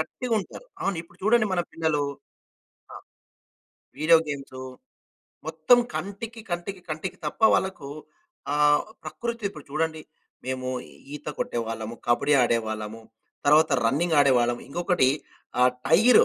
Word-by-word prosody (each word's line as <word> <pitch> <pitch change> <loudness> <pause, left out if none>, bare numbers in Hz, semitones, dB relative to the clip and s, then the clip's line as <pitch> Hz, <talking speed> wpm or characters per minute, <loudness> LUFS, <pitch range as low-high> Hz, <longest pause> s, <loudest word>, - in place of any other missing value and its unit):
గట్టిగుంటారు. 230 - -3 0.2
అవును. 195 -2 0
ఇప్పుడు 165 - -22
చూడండి 215 +2 +4
మన 180 - +2
పిల్లలూ 160 -3 0 0.9
ఆహ్, - - -10 1.0
వీడియో 160 +2 +6
గేమ్స్ 140 -2 -6 0.9
మొత్తం 160 +9 +4 0.2
కంటికి, 225 +4 -5
కంటికి, 175 +2 -3
కంటికి 155 +5 -4
తప్ప 150 - -5
వాళ్ళకూ 170 -7 -1 0.6
ఆహ్, 150 0 +4 0.2
ప్రకృతిప్పుడు 230 -9 -4
చూడండి, 160 +1 -1 0.4
మేమూ 130 0 -2 0.4
ఈత 150 - -9
కొట్టేవాళ్ళము, 115 -1 -3
కబడీ 140 +5 +3
ఆడేవాళ్ళము, 110 -2 -1 0.5
తరువాత 155 +2 +6
రన్నింగాడేవాళ్ళము. 135 -4 +3
ఇంకొకటి 175 -3 +2 0.5
ఆహ్, 125 0 +6 0.2
టైరు 215 - +7
155 Hz, 105 wpm, -26 LUFS, 130-185 Hz, 1.0 s, టైరు